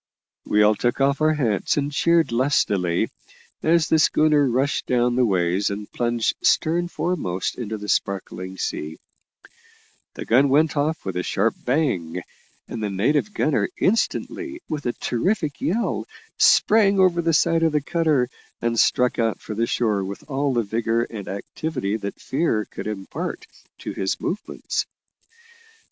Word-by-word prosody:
We 105 0 +4
all 105 +1 +5
took 120 +4 -1
off 140 +2 +2
our 155 0 +3
hats 115 -7 0
and 145 0 0
cheered 170 +1 +2
lustily 100 -9 +1 0.5
as 160 -1 +3
the 160 - +3
schooner 150 -2 +3
rushed 135 +4 0
down 120 -1 +2
the 125 -1 +3
ways 90 0 +1
and 100 +1 -6
plunged 120 -1 0
stern 170 +2 +2
foremost 160 - -2
into 110 -3 -4
the 105 0 -8
sparkling 95 -2 -2
sea; 80 -3 -4 1.2
the - - -6
gun 135 +4 +4
went 155 +4 +3
off 155 +2 -1
with 95 -2 -3
a - - 0
sharp 100 +5 0
bang, 90 - 0 0.4
and 115 - -6
the 105 - -1
native 140 - +1
gunner 155 - +1
instantly, 325 - -1
with 150 -4 -4
a 120 - 0
terrific 155 - -1
yell, 225 +8 -1 0.3
sprang 205 -2 +5
over 180 -2 +4
the 165 0 +1
side 165 +2 +3
of 165 -1 +3
the 150 - +2
cutter, 150 -4 +1 0.3
and 115 -1 0
struck 125 0 +2
out 115 -1 0
for 110 - -7
the 115 +2 0
shore 105 -5 0
with 100 +1 -6
all 140 0 0
the 120 -2 +1
vigour 115 +2 0
and 105 -4 -7
activity 110 +2 -3
that 100 -2 -5
fear 130 -7 0
could - - -8
impart 100 -3 -5 0.3
to - - -6
his 95 -1 -2
movements. 205 - -3
125 Hz, 155 wpm, -23 LUFS, 105-155 Hz, 1.2 s, all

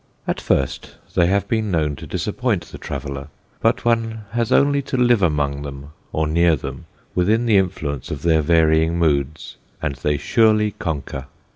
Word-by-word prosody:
At - - -1
first 65 0 -1 0.2
they 85 - +3
have 100 +2 +1
been 110 -3 0
known 75 -5 0
to - - -9
disappoint - - -1
the - - -11
traveller, 70 0 -5 0.3
but - - +1
one 115 -2 0
has 115 -1 -1
only 140 0 +4
to 135 -1 -3
live 120 -3 +4
among 75 -4 +1
them 70 0 -8 0.2
or 80 - 0
near 85 +2 +3
them, 70 - -7 0.3
within 110 +6 +2
the 110 -4 +4
influence 75 -8 -1
of 70 -2 -5
their 80 -2 +4
varying 80 +1 +3
moods, 75 -2 0 0.2
and 80 -3 -2
they 75 +2 0
surely 110 +3 +3
conquer. 70 -7 -4
80 Hz, 165 wpm, -21 LUFS, 70-110 Hz, 0.3 s, only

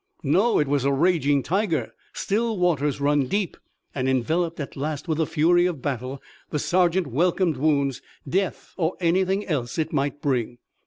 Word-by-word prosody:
No, 185 - +3
it 150 - +2
was 140 -1 +1
a 140 - +2
raging 145 -2 +2
tiger. 190 -3 -1 0.2
Still 225 +2 -1
waters 150 -6 +1
run 145 -1 +2
deep, 200 +2 -1 0.4
and, 130 -1 -1
enveloped, 160 +7 0
at 140 - -5
last, 150 +3 -4
with 160 -1 -1
the 160 - +1
fury 175 +3 +3
of 160 -8 -5
battle 130 0 -4 0.3
the 150 - -2
sergeant 180 +3 +2
welcomed 165 +3 +1
wounds, 140 -2 +1 0.3
death 190 +6 -2
or 165 -1 0
anything 190 +3 +1
else 130 -7 -2
it 160 0 -1
might 140 -1 -1
bring. 125 -4 -1
155 Hz, 165 wpm, -24 LUFS, 140-180 Hz, 0.4 s, No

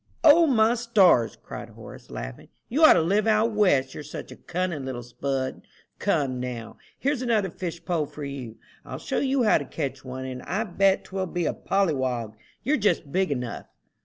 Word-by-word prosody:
"O, 325 +1 +7
my 230 -4 +4
stars!" 200 - +3
cried - - -8
Horace, - - -12
laughing, - - -7 0.2
"you 295 +7 +1
ought 315 - +10
to - - +3
live 200 +6 +2
'out 220 +1 +3
west,' 160 -12 +2
you're - - -7
such 150 +1 -8
a - - -9
cunning 175 -5 -3
little 130 -2 -5
spud. 130 +2 -3 0.4
Come, 130 -3 0
now, 120 -3 -6 0.2
here's 280 -1 0
another 220 -7 +1
fish 170 -2 -6
pole 165 -5 0
for 150 - -9
you. 135 -5 -6 0.3
I'll - - -7
show - - -2
you 270 -2 +1
how 215 - +4
to 145 - -6
catch 135 0 -4
one, 130 0 -6
and 130 -1 -6
I 200 +5 -2
bet 195 -1 +2
'twill 190 -1 -3
be 175 -1 -2
a - - 0
pollywog 130 - 0 0.3
you're 295 +2 +2
just 180 - 0
big 190 +1 +1
enough." 125 -4 -4
170 Hz, 190 wpm, -26 LUFS, 130-215 Hz, 0.4 s, ought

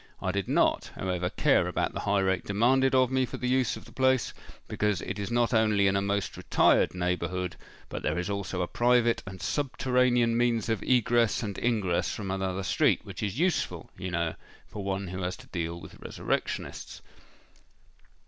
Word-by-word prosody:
I 95 - -1
did 100 0 -2
not, - - +2
however, 90 -1 -2
care - - +2
about - - -1
the - - -4
high 100 -1 +1
rate 95 -1 +1
demanded 130 +6 +3
of 130 -1 +4
me 130 0 +2
for 125 - -4
the 125 - -3
use 130 -1 +1
of - - -12
the - - -14
place, 130 -2 +2 0.3
because 105 -3 0
it 100 +1 -4
is 100 - -3
not 120 0 +1
only 110 -3 +3
in 95 0 +3
a 100 - +2
most 100 0 -1
retired - - +3
neighbourhood, 90 0 -2 0.3
but - - -6
there 75 - -1
is 90 +1 -2
also 100 -2 -2
a - - -2
private 120 +1 +2
and 95 -1 -8
subterranean 125 -3 +1
means 120 -2 +1
of 110 -3 0
egress 120 -2 +2
and 100 -3 -4
ingress 105 -7 0
from 100 -3 -4
another 95 0 -2
street, - - +2
which - - -8
is 105 +2 -2
useful, 180 +3 -1
you 95 0 -5
know, 85 -2 -1 0.3
for 105 - -7
one 95 -1 -2
who 90 +1 -5
has 90 0 -3
to - - -14
deal 85 -1 -3
with 80 - -11
resurrectionists." - - -4
100 Hz, 185 wpm, -28 LUFS, 95-120 Hz, 0.3 s, of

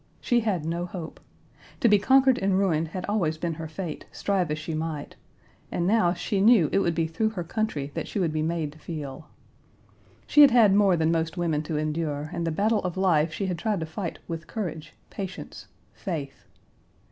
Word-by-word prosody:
She 240 - +2
had 200 -9 -1
no 170 +2 -2
hope. 170 -3 -7 0.6
To - - +4
be 210 -2 +5
conquered 265 +4 +4
and 195 -1 +1
ruined 165 -5 +1
had 180 +3 -5
always 175 -7 0
been 165 +1 -2
her 160 0 -6
fate, 160 0 -6
strive 190 -5 0
as 150 - -1
she 160 +1 -5
might, 155 -2 -4 0.6
and 175 - -1
now 195 -3 +3
she 195 +2 -1
knew 210 -7 +6
it - - +3
would 170 -4 +1
be 165 -1 +1
through 165 +8 0
her 195 -5 -5
country 165 -7 -2
that - - -4
she - - -5
would 170 -5 0
be 155 - 0
made 160 -2 -1
to 155 - -17
feel. 150 -2 -7 1.0
She 295 - +5
had 285 - +10
had 230 -5 +5
more 195 -3 +4
than 160 0 +2
most 165 +1 -1
women 165 -4 0
to 155 0 -3
endure, 155 0 -2
and 170 - -2
the - - 0
battle 210 +6 +2
of 180 -1 -3
life 170 -4 +3
she 195 - -3
had 180 -3 -2
tried 210 0 0
to - - -1
fight 165 +2 -5
with 165 -1 -5
courage, 160 -8 -5 0.2
patience, 190 -2 -7 0.3
faith. 150 -8 -6
170 Hz, 205 wpm, -26 LUFS, 155-200 Hz, 1.0 s, had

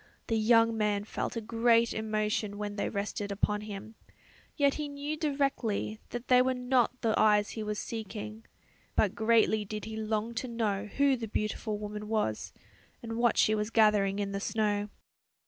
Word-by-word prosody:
The 225 - +2
young 230 +1 +4
man 210 -2 0
felt 215 - -4
a 230 - -2
great 230 +1 +3
emotion 215 -1 -1
when 205 0 -4
they 205 - -1
rested 200 0 -3
upon 210 +1 0
him, 210 +1 -8 0.6
yet 280 -2 +4
he 300 -1 -3
knew 285 +2 -4
directly 275 -8 -1
that 240 0 -6
they 250 0 +6
were 255 0 +1
not 250 0 +1
the 225 -2 +2
eyes 210 -1 +4
he 220 - -5
was 210 0 -3
seeking; 220 0 -6 0.5
but 205 -3 +3
greatly 220 -1 +3
did 210 +1 -6
he 220 0 -6
long 220 +1 -2
to 245 +2 -3
know 215 -4 -1
who 275 +5 +2
the 230 -3 -5
beautiful 215 0 -2
woman 210 0 -6
was, 210 - -1 0.5
and 225 -1 -4
what 235 -1 +2
she 215 - +4
was 210 0 -1
gathering 210 -3 +3
in 200 -1 -2
the 200 - -2
snow. 210 -1 0
220 Hz, 175 wpm, -30 LUFS, 210-235 Hz, 0.6 s, they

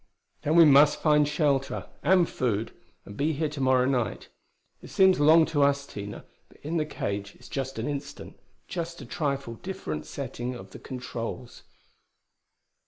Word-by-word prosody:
"Then 155 - 0
we 170 -1 +9
must 145 0 +6
find 150 -2 +4
shelter, 145 -3 0 0.2
and 175 +1 +4
food, 115 -3 -1 0.3
and 100 - -10
be 150 +7 0
here 155 +1 -1
to 145 -1 -6
morrow 130 -1 +3
night. 130 -3 -1 0.5
It - - -12
seems 190 -3 +4
long 160 +2 +6
to 145 - +2
us, 140 0 +2
Tina, 100 -5 -8 0.2
but - - -20
in 160 +3 -2
the 155 -1 0
cage 100 -7 -4
it's - - -15
just 135 -2 -4
an 115 - -3
instant 145 -1 -6 0.3
just 170 -1 -5
a - - -10
trifle 140 -6 -3
different 80 - -5
setting 125 +1 -5
of 95 -5 -11
the - - -10
controls." 125 -1 -6
140 Hz, 165 wpm, -27 LUFS, 120-155 Hz, 0.5 s, we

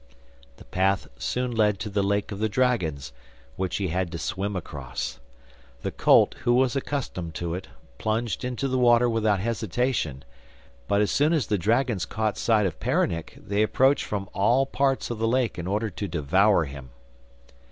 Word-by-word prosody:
The - - -14
path 95 +1 +1
soon 125 0 -1
led 105 -3 +2
to - - -3
the 100 0 0
lake 100 +1 0
of 100 - -5
the 110 0 +1
dragons, 85 - 0 0.4
which 95 -1 -2
he 95 -3 -1
had 90 0 -1
to 85 - -4
swim 95 +5 -3
across. 70 -8 -5 0.6
The - - -2
colt, - - +4
who 120 - +2
was 130 +1 +2
accustomed 120 - -3
to 85 +1 -3
it, 90 - -5 0.3
plunged 110 0 -1
into 125 +2 -2
the 130 -1 0
water 120 0 +5
without 110 -4 +1
hesitation; 115 - -1 0.6
but 100 +1 +2
as 105 - +1
soon 150 +4 +3
as 155 -7 +1
the 105 - 0
dragons 110 - +1
caught 110 -1 -1
sight 110 -3 +3
of 85 -4 -3
Peronnik 80 -1 -1
they 100 0 -1
approached 130 +6 +3
from 100 -2 -3
all 120 +7 +3
parts 135 -2 0
of 115 - -4
the 115 - +1
lake 120 -4 0
in 85 - -4
order 105 +2 -1
to 100 +4 -4
devour 85 +3 +3
him. 65 -2 -9
105 Hz, 175 wpm, -26 LUFS, 90-120 Hz, 0.6 s, water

